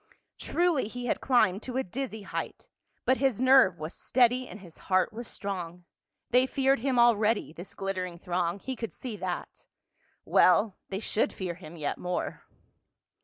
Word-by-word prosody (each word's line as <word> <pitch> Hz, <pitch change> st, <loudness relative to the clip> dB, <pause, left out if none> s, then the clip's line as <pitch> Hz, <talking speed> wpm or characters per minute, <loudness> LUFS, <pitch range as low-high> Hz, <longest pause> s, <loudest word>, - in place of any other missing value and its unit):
Truly 340 Hz, -9 st, +1 dB
he 245 Hz, +2 st, -6 dB
had 245 Hz, -, -1 dB
climbed 220 Hz, -7 st, +3 dB
to 250 Hz, +1 st, -5 dB
a 265 Hz, -, +1 dB
dizzy 220 Hz, +1 st, -5 dB
height, -, -, -5 dB, 0.4 s
but 260 Hz, -, +3 dB
his 265 Hz, -5 st, +1 dB
nerve 255 Hz, -8 st, +6 dB
was 155 Hz, +2 st, -6 dB
steady 250 Hz, 0 st, +2 dB
and 215 Hz, -, -10 dB
his 175 Hz, -4 st, -12 dB
heart 185 Hz, +3 st, +3 dB
was 235 Hz, +1 st, -7 dB
strong. 180 Hz, -3 st, -5 dB, 0.5 s
They 250 Hz, +2 st, +5 dB
feared 270 Hz, -1 st, +2 dB
him 260 Hz, +1 st, 0 dB
already, 225 Hz, -6 st, +3 dB
this 175 Hz, +3 st, -10 dB
glittering 185 Hz, -3 st, -3 dB
throng, 175 Hz, 0 st, -1 dB
he 260 Hz, +6 st, -5 dB
could 230 Hz, -2 st, -5 dB
see 245 Hz, -4 st, -6 dB
that. -, -, -5 dB, 0.6 s
Well, 185 Hz, +3 st, +4 dB
they 195 Hz, -, -3 dB
should 220 Hz, -, 0 dB
fear 185 Hz, -3 st, -4 dB
him 170 Hz, -1 st, -11 dB
yet 150 Hz, -3 st, -3 dB
more. 180 Hz, 0 st, -3 dB
215 Hz, 165 wpm, -28 LUFS, 180-255 Hz, 0.6 s, nerve